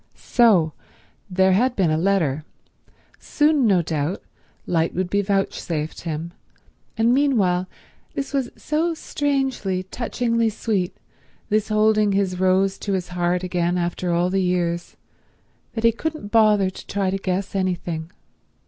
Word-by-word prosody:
So 195 Hz, -11 st, +3 dB, 0.6 s
there 190 Hz, 0 st, +3 dB
had 245 Hz, +7 st, +2 dB
been 180 Hz, -5 st, +2 dB
a -, -, +2 dB
letter. 165 Hz, -6 st, +1 dB, 0.8 s
Soon, 295 Hz, -4 st, +2 dB
no 185 Hz, -4 st, +3 dB
doubt, 155 Hz, +3 st, -2 dB, 0.4 s
light 165 Hz, -1 st, 0 dB
would 180 Hz, 0 st, -2 dB
be 200 Hz, -, +2 dB
vouchsafed 190 Hz, -5 st, -2 dB
him, 165 Hz, +1 st, -4 dB, 0.6 s
and 230 Hz, +2 st, +3 dB
meanwhile 205 Hz, -10 st, +2 dB, 0.5 s
this 275 Hz, +1 st, -4 dB
was 270 Hz, -3 st, 0 dB
so 325 Hz, +2 st, -1 dB
strangely, 270 Hz, -, -1 dB
touchingly 230 Hz, +2 st, -1 dB
sweet, 200 Hz, -4 st, -2 dB, 0.5 s
this 215 Hz, 0 st, +1 dB
holding 215 Hz, -1 st, +3 dB
his 190 Hz, -2 st, 0 dB
Rose 190 Hz, +1 st, +2 dB
to 200 Hz, -, -2 dB
his 180 Hz, -2 st, -2 dB
heart 180 Hz, 0 st, 0 dB
again 175 Hz, -1 st, 0 dB
after 175 Hz, 0 st, -1 dB
all 175 Hz, +1 st, +1 dB
the 195 Hz, 0 st, +1 dB
years, 175 Hz, -1 st, -1 dB, 0.8 s
that 225 Hz, -, -3 dB
he 230 Hz, -, +6 dB
couldn't 305 Hz, -3 st, -5 dB
bother 210 Hz, -4 st, +4 dB
to -, -, -12 dB
try 195 Hz, -2 st, -1 dB
to 195 Hz, -, -1 dB
guess 190 Hz, 0 st, -2 dB
anything. 175 Hz, -4 st, -2 dB
190 Hz, 140 wpm, -22 LUFS, 180-225 Hz, 0.8 s, he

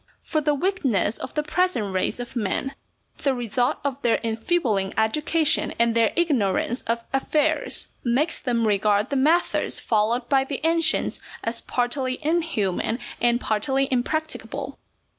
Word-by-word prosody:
For 310 Hz, -, -1 dB
the 295 Hz, 0 st, +1 dB
weakness 270 Hz, -, 0 dB
of 260 Hz, -, -7 dB
the 300 Hz, -, +1 dB
present 300 Hz, -, 0 dB
race 185 Hz, +5 st, -1 dB
of 245 Hz, +1 st, -7 dB
men 235 Hz, +4 st, -1 dB, 0.5 s
(the 275 Hz, -2 st, +1 dB
result 245 Hz, 0 st, 0 dB
of 280 Hz, -1 st, -3 dB
their 235 Hz, -, +2 dB
enfeebling 225 Hz, -, 0 dB
education 300 Hz, +7 st, +2 dB
and 235 Hz, 0 st, +3 dB
their 230 Hz, -1 st, +3 dB
ignorance 250 Hz, -, +1 dB
of 230 Hz, 0 st, -1 dB
affairs), 300 Hz, +3 st, +1 dB
makes 265 Hz, +7 st, +1 dB
them 235 Hz, -3 st, 0 dB
regard 205 Hz, +2 st, +2 dB
the -, -, 0 dB
methods 315 Hz, +6 st, +2 dB
followed 230 Hz, +3 st, 0 dB
by 270 Hz, -1 st, +3 dB
the 275 Hz, 0 st, -4 dB
ancients 330 Hz, -1 st, +2 dB, 0.2 s
as 230 Hz, +1 st, -2 dB
partly 255 Hz, +1 st, -1 dB
inhuman 255 Hz, -, 0 dB, 0.2 s
and 240 Hz, 0 st, +3 dB
partly 265 Hz, +5 st, 0 dB
impracticable. 310 Hz, +5 st, -3 dB
250 Hz, 140 wpm, -24 LUFS, 225-300 Hz, 0.5 s, and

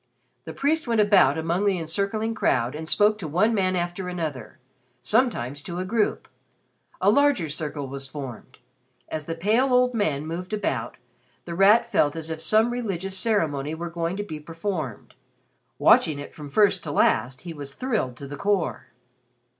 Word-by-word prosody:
The 160 Hz, -, -7 dB
priest 305 Hz, +1 st, 0 dB
went 230 Hz, -2 st, +1 dB
about 195 Hz, -9 st, +5 dB
among 165 Hz, +4 st, 0 dB
the 195 Hz, -2 st, +2 dB
encircling 200 Hz, +7 st, -2 dB
crowd 125 Hz, -, +1 dB
and 160 Hz, +1 st, -6 dB
spoke 210 Hz, +4 st, +3 dB
to 175 Hz, -, -5 dB
one 190 Hz, +10 st, +2 dB
man 185 Hz, -3 st, +1 dB
after 175 Hz, +1 st, -3 dB
another 155 Hz, -9 st, -5 dB, 0.5 s
sometimes 145 Hz, -, 0 dB
to 175 Hz, +3 st, -6 dB
a 185 Hz, -, -2 dB
group. 220 Hz, +2 st, 0 dB, 0.7 s
A -, -, +4 dB
larger 285 Hz, -, +3 dB
circle 150 Hz, -2 st, -3 dB
was 135 Hz, +1 st, -6 dB
formed. 130 Hz, -3 st, -8 dB, 0.5 s
As 155 Hz, -1 st, -4 dB
the 165 Hz, -, -4 dB
pale 220 Hz, +10 st, +2 dB
old 250 Hz, 0 st, +4 dB
man 155 Hz, -10 st, 0 dB
moved 180 Hz, +5 st, -5 dB
about, 130 Hz, -, -2 dB, 0.5 s
The 170 Hz, -, -5 dB
Rat 210 Hz, +6 st, +5 dB
felt 145 Hz, -7 st, +2 dB
as 160 Hz, 0 st, -3 dB
if 160 Hz, 0 st, -4 dB
some 220 Hz, +5 st, +3 dB
religious 195 Hz, -6 st, -3 dB
ceremony 160 Hz, -9 st, 0 dB
were 170 Hz, +1 st, -5 dB
going 170 Hz, +2 st, -2 dB
to 205 Hz, -, -2 dB
be 155 Hz, -7 st, -7 dB
performed. 165 Hz, -, -5 dB, 0.6 s
Watching 155 Hz, -3 st, +4 dB
it 145 Hz, -, -8 dB
from 150 Hz, -2 st, -9 dB
first 200 Hz, +3 st, +3 dB
to 150 Hz, -, -3 dB
last, 125 Hz, -2 st, +2 dB
he 170 Hz, -2 st, -7 dB
was 140 Hz, -2 st, -7 dB
thrilled 220 Hz, -, -2 dB
to 140 Hz, -, -8 dB
the 145 Hz, +1 st, -7 dB
core. 200 Hz, -1 st, -1 dB
170 Hz, 170 wpm, -25 LUFS, 150-210 Hz, 0.7 s, about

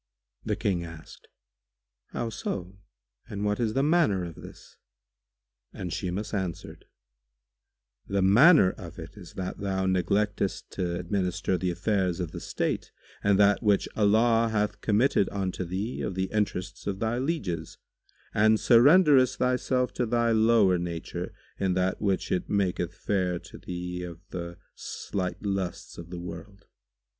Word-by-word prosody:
The -, -, -1 dB
King 90 Hz, -4 st, -1 dB
asked, 80 Hz, -2 st, -11 dB, 0.8 s
"How 115 Hz, -1 st, -4 dB
so? 95 Hz, -2 st, -5 dB, 0.5 s
And 100 Hz, 0 st, -3 dB
what 105 Hz, 0 st, 0 dB
is 110 Hz, -2 st, 0 dB
the 135 Hz, -, +2 dB
manner 150 Hz, -, +3 dB
of 85 Hz, -, -7 dB
this?"; -, -, -13 dB, 0.9 s
and 90 Hz, -2 st, -6 dB
Shimas 95 Hz, +3 st, -3 dB
answered, 95 Hz, -5 st, -4 dB, 1.2 s
"The 100 Hz, -1 st, +1 dB
manner 110 Hz, -, +7 dB
of -, -, -10 dB
it -, -, -9 dB
is -, -, -12 dB
that 95 Hz, -1 st, -5 dB
thou 95 Hz, -1 st, -1 dB
neglectest 100 Hz, +2 st, 0 dB
to 90 Hz, -2 st, -2 dB
administer 90 Hz, 0 st, -1 dB
the 90 Hz, 0 st, -1 dB
affairs 95 Hz, 0 st, 0 dB
of 85 Hz, -3 st, -3 dB
the -, -, -6 dB
state -, -, -2 dB, 0.3 s
and 100 Hz, -1 st, +4 dB
that 100 Hz, 0 st, +4 dB
which 105 Hz, -4 st, +2 dB
Allah 115 Hz, +2 st, +4 dB
hath 105 Hz, -1 st, -1 dB
committed 110 Hz, -1 st, +2 dB
unto 95 Hz, -2 st, -2 dB
thee 95 Hz, +7 st, -3 dB
of 95 Hz, -, -3 dB
the 95 Hz, 0 st, -2 dB
interests 100 Hz, -3 st, -2 dB
of 100 Hz, -2 st, -1 dB
thy 115 Hz, +4 st, -1 dB
lieges 100 Hz, -, -3 dB, 0.6 s
and 110 Hz, +1 st, +4 dB
surrenderest 130 Hz, -, +6 dB
thyself 125 Hz, 0 st, +1 dB
to 125 Hz, -, -1 dB
thy 120 Hz, 0 st, +2 dB
lower 110 Hz, -5 st, +4 dB
nature 85 Hz, -1 st, -4 dB, 0.3 s
in 95 Hz, -2 st, +1 dB
that 95 Hz, 0 st, 0 dB
which 100 Hz, -3 st, 0 dB
it 90 Hz, -, -1 dB
maketh 90 Hz, -3 st, 0 dB
fair 90 Hz, -4 st, 0 dB
to 90 Hz, +2 st, -12 dB
thee 90 Hz, 0 st, -5 dB
of 85 Hz, -2 st, -7 dB
the 85 Hz, -1 st, -6 dB, 0.2 s
slight 90 Hz, -1 st, -4 dB
lusts 95 Hz, -4 st, -3 dB
of 85 Hz, 0 st, -9 dB
the 90 Hz, -1 st, -6 dB
world. 95 Hz, +3 st, -9 dB
100 Hz, 145 wpm, -27 LUFS, 90-110 Hz, 1.2 s, manner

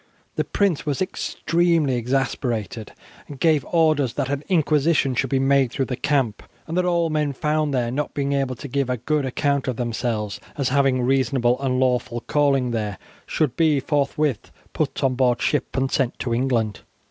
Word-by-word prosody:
The -, -, +1 dB
prince 195 Hz, -7 st, 0 dB
was 145 Hz, -3 st, -2 dB
extremely 170 Hz, -5 st, 0 dB
exasperated, 120 Hz, -4 st, -2 dB, 0.4 s
and 140 Hz, -2 st, -10 dB
gave 155 Hz, -2 st, +3 dB
orders 155 Hz, -7 st, +2 dB
that 135 Hz, -2 st, -1 dB
an 145 Hz, +1 st, -2 dB
inquisition 155 Hz, -4 st, +2 dB
should 130 Hz, +2 st, 0 dB
be 135 Hz, -, +1 dB
made 135 Hz, -2 st, +3 dB
through 135 Hz, 0 st, -1 dB
the 130 Hz, -, -3 dB
camp, 135 Hz, -6 st, 0 dB, 0.2 s
and 165 Hz, -, -5 dB
that 180 Hz, 0 st, +2 dB
all 170 Hz, -2 st, +1 dB
men 150 Hz, -2 st, 0 dB
found 150 Hz, +2 st, 0 dB
there 120 Hz, -3 st, 0 dB
not 145 Hz, +4 st, -3 dB
being 140 Hz, 0 st, 0 dB
able 135 Hz, -2 st, 0 dB
to 145 Hz, -, -8 dB
give 140 Hz, 0 st, -1 dB
a 125 Hz, -, 0 dB
good 145 Hz, +4 st, -1 dB
account 140 Hz, +1 st, 0 dB
of 130 Hz, -, -1 dB
themselves 115 Hz, -3 st, -2 dB, 0.2 s
as 135 Hz, -2 st, 0 dB
having 135 Hz, -2 st, +2 dB
reasonable 130 Hz, -1 st, +1 dB
and 130 Hz, -2 st, 0 dB
lawful 125 Hz, -2 st, 0 dB
calling 135 Hz, -4 st, +1 dB
there 105 Hz, -4 st, -2 dB, 0.3 s
should 150 Hz, -6 st, 0 dB
be 155 Hz, -4 st, +3 dB
forthwith 145 Hz, -2 st, -1 dB, 0.2 s
put -, -, -2 dB
on 135 Hz, -1 st, +3 dB
board 125 Hz, -1 st, +2 dB
ship 145 Hz, -2 st, -1 dB
and 130 Hz, 0 st, 0 dB
sent 130 Hz, -3 st, 0 dB
to 120 Hz, -, -2 dB
England. 115 Hz, -4 st, 0 dB
135 Hz, 180 wpm, -23 LUFS, 125-150 Hz, 0.4 s, gave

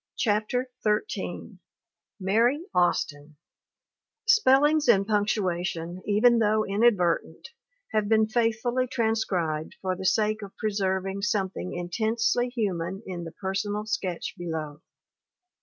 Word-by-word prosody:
CHAPTER 230 Hz, +4 st, 0 dB
XIII 210 Hz, -, -2 dB, 0.6 s
MARY 230 Hz, -, +2 dB
AUSTIN 150 Hz, -4 st, 0 dB, 0.9 s
[Spellings 305 Hz, -, +4 dB
and 195 Hz, 0 st, +5 dB
punctuation, 185 Hz, -5 st, -1 dB
even 230 Hz, +3 st, +4 dB
though 215 Hz, 0 st, +2 dB
inadvertent, 195 Hz, -6 st, +1 dB, 0.4 s
have 215 Hz, -1 st, 0 dB
been 220 Hz, -1 st, +4 dB
faithfully 235 Hz, +2 st, 0 dB
transcribed 195 Hz, -10 st, -1 dB
for 185 Hz, -1 st, -2 dB
the 190 Hz, +1 st, -2 dB
sake 215 Hz, +1 st, +1 dB
of 200 Hz, -1 st, -10 dB
pre 215 Hz, -, -1 dB
serving 190 Hz, 0 st, -1 dB
something 195 Hz, -3 st, -2 dB
intensely 225 Hz, +7 st, 0 dB
human 195 Hz, -5 st, -3 dB
in 175 Hz, -2 st, -5 dB
the 165 Hz, -, -7 dB
personal 205 Hz, +3 st, -3 dB
sketch 185 Hz, -5 st, -3 dB
below. 160 Hz, -4 st, -5 dB
205 Hz, 110 wpm, -26 LUFS, 180-225 Hz, 0.9 s, and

